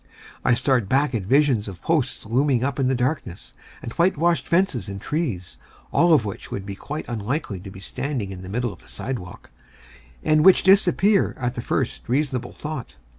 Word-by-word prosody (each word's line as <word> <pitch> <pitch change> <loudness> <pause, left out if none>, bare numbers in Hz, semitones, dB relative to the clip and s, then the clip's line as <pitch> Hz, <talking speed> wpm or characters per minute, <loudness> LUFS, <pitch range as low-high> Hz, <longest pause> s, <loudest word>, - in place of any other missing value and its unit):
I 120 - +4
start 125 -4 +1
back 135 0 +2
at 115 - 0
visions 130 +1 +2
of 95 -3 -9
posts 150 -8 0
looming 125 +2 +2
up 140 0 -1
in 130 - +2
the 130 - +2
darkness, 125 - -3 0.3
and 115 - -5
whitewashed 170 0 +2
fences 170 - +1
and 100 0 -5
trees, 115 - -3 0.3
all 175 0 +4
of 145 -9 +5
which 100 - -6
would 100 - -5
be 100 - -5
quite 150 +10 -6
unlikely 115 - -3
to 95 +2 -9
be 95 - -11
standing 115 0 -4
in 95 -1 -8
the 95 - -9
middle 120 +2 -2
of - - -16
the - - -21
sidewalk, 90 - -7 0.7
and 155 0 +4
which 190 +1 +7
disappear 195 +1 +4
at 125 -1 -2
the 120 - -4
first - - -2
reasonable 130 -2 0
thought. 150 -5 -6
130 Hz, 185 wpm, -23 LUFS, 105-150 Hz, 0.7 s, which